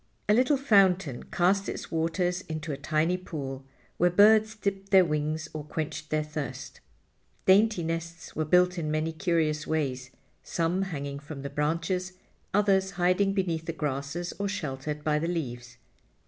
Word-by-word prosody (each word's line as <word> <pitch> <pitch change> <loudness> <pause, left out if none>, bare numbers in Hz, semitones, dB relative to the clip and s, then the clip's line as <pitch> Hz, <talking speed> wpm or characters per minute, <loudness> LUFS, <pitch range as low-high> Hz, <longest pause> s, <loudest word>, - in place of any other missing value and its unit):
A 210 - +5
little 255 +5 +4
fountain 195 - +3
cast 195 +2 +1
its - - -6
waters 175 +3 0
into 155 0 -4
a - - -2
tiny 155 +5 0
pool, 140 -7 -6 0.3
where 175 - +4
birds 215 +4 +5
dipped 200 -2 -3
their 190 -2 +6
wings 155 0 -1
or 155 -1 -5
quenched 155 0 -5
their 155 0 +1
thirst. 150 -1 -6 0.7
Dainty 200 -1 +4
nests 165 +1 -5
were 155 - 0
built 180 +3 +3
in 155 -2 -2
many 155 +1 -1
curious 160 -3 0
ways, 130 -5 -2 0.3
some 170 +3 -1
hanging 140 -7 -4
from 145 -1 -8
the 140 - -5
branches, 165 +5 -1 0.4
others 195 -2 +3
hiding 185 +2 +2
beneath 170 -5 -1
the 165 - -2
grasses 150 +3 -3
or 200 - 0
sheltered 150 -4 -4
by 150 0 +1
the 165 - -2
leaves. 125 -8 -4
165 Hz, 155 wpm, -28 LUFS, 150-190 Hz, 0.7 s, their